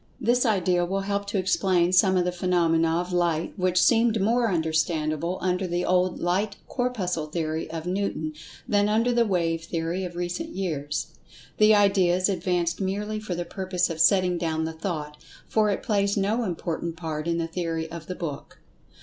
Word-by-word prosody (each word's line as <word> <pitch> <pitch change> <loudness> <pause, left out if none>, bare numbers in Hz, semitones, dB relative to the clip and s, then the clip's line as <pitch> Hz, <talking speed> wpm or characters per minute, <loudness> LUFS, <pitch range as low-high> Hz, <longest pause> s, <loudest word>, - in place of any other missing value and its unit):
This 245 +1 +2
idea 185 -4 +2
will 195 +3 -1
help 200 +1 -2
to 200 - -2
explain 185 -2 +2
some 185 0 +4
of 180 - +2
the 180 - 0
phenomena 165 -2 +2
of 180 +1 -3
Light, 170 -2 0
which 185 -2 +1
seemed 225 +1 +4
more 230 +4 +2
understandable 160 0 0
under 185 0 0
the 175 0 -1
old 180 0 +2
Light 195 +4 0
Corpuscle 195 - -2
theory 160 0 -3
of 160 0 -5
Newton 180 -4 -2 0.3
than 205 -3 +2
under 225 +3 +2
the 235 -1 +2
"wave" 165 -4 0
theory 170 +2 -2
of 175 -1 -6
recent 175 - -4
years. 150 -6 -3 0.4
The 215 0 +6
idea 195 -4 +4
is 185 +2 +1
advanced 175 -1 -1
merely 205 +3 -2
for 215 -4 -4
the 175 0 -3
purpose 185 -2 -1
of 160 - -6
setting 180 0 +4
down 160 -1 -1
the 160 - -4
thought, 155 -3 -5 0.3
for 215 -1 +2
it 200 - -2
plays 200 -2 +1
no 215 +4 +1
important 170 -2 -3
part 160 -2 -4
in 170 0 0
the 165 - -1
theory 165 -1 -3
of 165 -2 -8
the 185 - -4
book. 155 -6 -6
180 Hz, 180 wpm, -25 LUFS, 165-200 Hz, 0.4 s, The